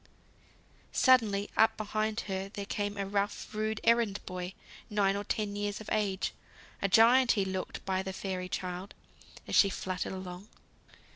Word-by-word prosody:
Suddenly 215 -6 +4
up 220 0 +4
behind 215 +1 -1
her 190 0 -4
there 200 0 -6
came 205 0 -2
a 200 - -1
rough, 200 +2 -2
rude 215 0 -1
errand 230 -3 +3
boy, 185 0 -5 0.3
nine 200 -2 +2
or 200 - -2
ten 205 0 -2
years 205 0 -2
of 220 - -9
age; 200 -3 0 0.5
a 195 - +2
giant 235 +5 +6
he 200 -4 +1
looked 190 -1 -4
by 190 -1 0
the 190 0 -4
fairy 185 -1 -4
child, 185 +2 -4 0.5
as - - -5
she 200 - +6
fluttered 185 0 -3
along. 185 +1 -7
200 Hz, 155 wpm, -31 LUFS, 190-215 Hz, 0.5 s, giant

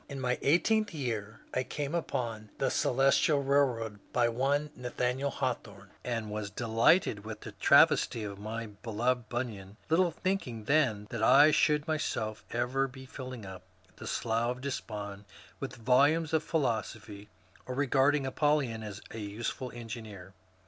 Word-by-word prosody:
Li 140 - -6
my 125 -2 -1
eighteenth 210 +7 +2
year 115 -6 -4
I 130 - +1
came 145 +3 -4
upon 115 -10 -3
^^ - - -29
The - - +1
Celestial 135 +3 +3
Bailroad 125 -7 +1
" - - -31
by 120 -1 +3
one 140 +5 0
Nathaniel 125 +2 -1
Hawthorne, 105 -8 -4
and 115 -3 -3
was 105 -1 -3
delighted 115 - +2
with 110 -1 -7
the - - -8
travesty 115 - +4
of 100 -1 -6
my 110 +2 -4
beloved 115 +3 -2
Bunyan, 110 -5 -4
little 175 +2 +4
thinking 160 - -3
then 120 -6 +2
that 115 - -3
I 145 +7 +7
should 150 0 +2
myself 110 -9 -2
ever 125 +3 0
be 130 0 -11
filling 130 -4 -8
up 95 -1 -8 0.4
the - - -8
Slough 115 +1 0
of - - -12
Despond 105 -7 -5 0.3
with - - -5
volumes 145 +7 +3
of 160 - +3
philosophy, 110 -8 -2 0.4
or 130 - -4
regarding 140 +1 +3
ApoUyon 135 -5 +1
as 105 -1 -7
a 115 - -6
useful 115 +4 -4
engineer. 110 -5 -8
120 Hz, 150 wpm, -30 LUFS, 110-140 Hz, 0.4 s, I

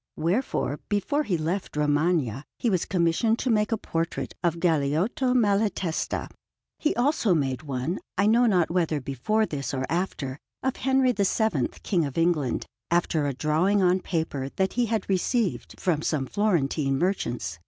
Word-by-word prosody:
Wherefore, 165 - 0
before 205 +9 +1
he 190 - 0
left 165 +1 -3
Romagna, 145 -4 +1
he 235 - 0
was 185 -3 +1
commissioned 180 +5 +2
to 250 - 0
make 210 -1 +2
a 225 - +2
portrait 165 -5 -3
of 170 -1 +1
Galeotto 170 - +1
Malatesta. 200 -6 0 0.5
He 310 - +1
also 240 - +2
made 135 -4 -1
one, 140 +4 -3 0.2
I 200 - +3
know 235 +3 +4
not 180 -6 +2
whether 165 -4 +1
before 140 - 0
this 140 -5 -4
or 130 0 -1
after, 150 -6 -2 0.2
of 265 -1 -1
Henry 265 -1 +3
VII, 200 - +1 0.2
King 175 -6 +1
of 140 +1 -6
England, 165 -6 +1 0.2
after 165 -3 +1
a 140 - -1
drawing 170 +8 +2
on 180 +1 +4
paper 160 -7 -2
that 190 -1 0
he 240 -1 +1
had 225 0 -1
received 200 +2 -1
from 165 -5 +1
some 150 -4 0
Florentine 150 -7 +1
merchants. 120 - -2
175 Hz, 155 wpm, -26 LUFS, 150-210 Hz, 0.5 s, know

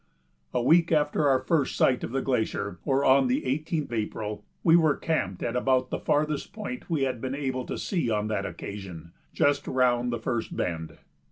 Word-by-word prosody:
A 125 - 0
week 165 +5 +4
after 150 -1 +2
our 135 - +5
first 145 0 +1
sight 125 - +2
of - - -4
the 135 +1 -1
glacier, 110 -7 -1
or 135 0 +2
on 130 0 +5
the 125 - 0
18th 150 +2 -2
April, 105 -1 -3 0.2
we 165 -1 +6
were 160 -4 +4
camped 95 - -2
at 115 - -2
about 130 0 +1
the - - -2
farthest 150 +4 0
point 220 +2 -6
we 155 -5 +1
had 130 -3 -2
been 130 +1 -3
able 130 -3 -3
to - - -4
see 170 - -1
on 105 -1 0
that 105 -2 -1
occasion 90 -5 -8 0.2
just 145 0 +1
round 125 -1 +2
the 120 - -1
first 115 0 -3
bend. 80 -2 -3
130 Hz, 190 wpm, -27 LUFS, 115-150 Hz, 0.2 s, we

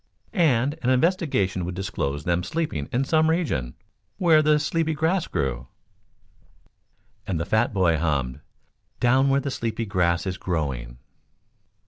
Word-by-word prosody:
"And 145 - +2
an 125 - 0
investigation 130 - +1
would 90 +1 -4
disclose 75 -7 -3
them 85 0 +1
sleeping 95 - -3
in 130 +3 0
some 160 +2 +3
region, 110 - -1 0.4
where 165 -4 +5
the 150 0 +4
sleepy 160 +2 0
grass 165 +4 0
grew 65 -3 -2 1.6
And 90 -4 -1
the 85 - -2
fat 110 +5 +1
boy 90 -6 +2
hummed: 70 -6 -1 0.6
"Down 130 +3 +3
where 135 +1 +2
the 140 0 -3
sleepy 115 -2 -3
grass 90 -4 +1
is 90 -2 -3
growing." 65 -9 -3
110 Hz, 135 wpm, -24 LUFS, -, 1.6 s, where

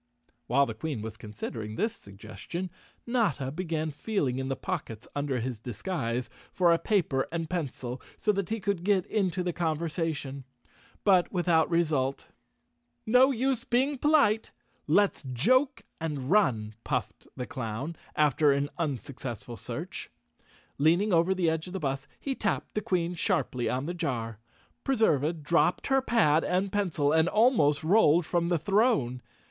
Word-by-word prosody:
Wliile 140 +4 +4
the 115 - -5
Queen 120 -1 -4
was 110 -1 -6
considering 110 0 -6
this 225 - -1
suggestion, 110 - -7 0.3
Notta 185 - 0
began 160 -1 -2
feeling 145 - -1
in 135 - -3
the 135 - 0
pockets 130 - -5
under 140 -3 -1
his 120 -1 -4
disguise 120 - -3 0.2
for 175 -2 +4
a 165 - +2
paper 160 -11 +1
and 165 -1 -2
pencil, 135 -7 -4 0.2
so 210 - +2
that 200 -3 -2
he 225 +1 -1
could 200 -4 -1
get 195 -2 +2
into 185 -4 0
the 175 -1 -1
conversation, 160 -4 -2 0.6
but 185 -4 +4
without 175 -3 +2
result. 150 -6 0 0.8
"No 250 +4 +6
use 260 -1 0
being 265 +2 +1
polite 280 -8 +3
I - - -42
Let's 200 +6 +3
joke 225 - +2 0.2
and 150 -4 -3
run," 115 - +2
puffed 120 -6 -3
the 125 - -3
clown, 130 +6 -4 0.2
after 150 0 +4
an 140 +1 0
unsuccessful 130 -5 -4
search. - - -6 0.7
Leaning 175 +7 +3
over 170 +3 +3
the 180 -2 +1
edge 160 +1 0
of 180 - -8
the 190 - -3
bus, 135 -3 -3
he 275 - -2
tapped 215 -5 -2
the 210 - -1
Queen 180 -3 0
sharply 125 -7 0
on 130 +2 -1
the 175 - -3
jar. 115 -9 -3 0.4
Preserva 165 - +2
dropped 170 +4 +2
her 270 -1 +3
pad 165 - +3
and 185 +2 0
pencil 175 -8 +1
and 160 +2 +4
almost 210 - +3
rolled 175 -2 +4
from 170 0 0
the 175 - +2
throne. 165 - +2
160 Hz, 155 wpm, -28 LUFS, 135-195 Hz, 0.8 s, No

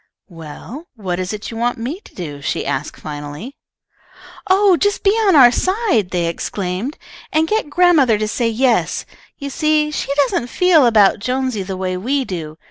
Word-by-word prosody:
"Well, 175 - -10
what 185 -5 -4
is 185 0 -3
it 210 +1 -6
you 225 - -7
want 240 +1 -1
me 255 +10 -4
to - - -19
do?" 145 -6 -7
she - - -2
asked, 135 +3 -3
finally. 150 - -7 1.0
"Oh, 385 0 +5
just 410 +3 0
be 395 - +5
on 420 -4 +3
our 250 -4 +8
side!" 370 - 0
they 175 -2 -1
exclaimed, 185 - -3 0.3
"and 315 +1 +2
get 430 -6 -1
grandmother 295 -8 +4
to 215 0 -2
say 230 +2 0
yes. 235 +1 +1 0.3
You 280 -1 -6
see 305 +1 +1
she 300 - -3
doesn't 270 -4 +1
feel 320 0 +4
about 210 -3 +4
Jonesy 255 0 -2
the 190 0 -5
way 185 -1 -2
we 265 +8 -1
do. 160 -6 -6
240 Hz, 175 wpm, -18 LUFS, 185-305 Hz, 1.0 s, our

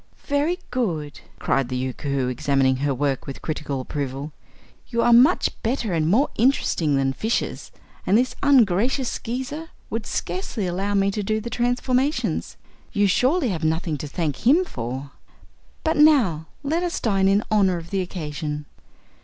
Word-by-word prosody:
"Very 295 +5 +1
good!" 165 - -2 0.2
cried 135 -3 0
the 130 - -2
Yookoohoo, 130 +1 -2
examining 130 +1 +1
her 140 +2 0
work 135 0 -1
with 135 - -7
critical 150 -3 -3
approval. 140 +2 -4 0.6
"You 235 -1 0
are 240 - +5
much 260 +10 +5
better 230 -4 -1
and 160 -2 +1
more 235 - +3
interesting 210 - +2
than 135 -1 +1
fishes, 220 - -2 0.4
and 195 - +5
this 255 +2 +1
ungracious 250 -1 +3
Skeezer 265 +7 -5 0.2
would 225 -1 -3
scarcely 185 +3 -3
allow 195 +3 -1
me 200 0 +3
to 210 - -2
do 215 +2 0
the 235 +2 -6
transformations. 250 +4 0 0.3
You 205 0 +2
surely 255 - +2
have 170 -4 -3
nothing 160 0 0
to 150 - -5
thank 150 -2 -2
him 305 +10 +4
for. 130 - -5 0.7
But 320 -1 +1
now 240 - +4 0.2
let 315 +5 0
us 350 -1 -2
dine 195 -4 +2
in 200 +2 +3
honor 195 -4 +3
of 165 0 -9
the 195 -1 0
occasion." 150 -4 -4
195 Hz, 155 wpm, -23 LUFS, 150-250 Hz, 0.7 s, are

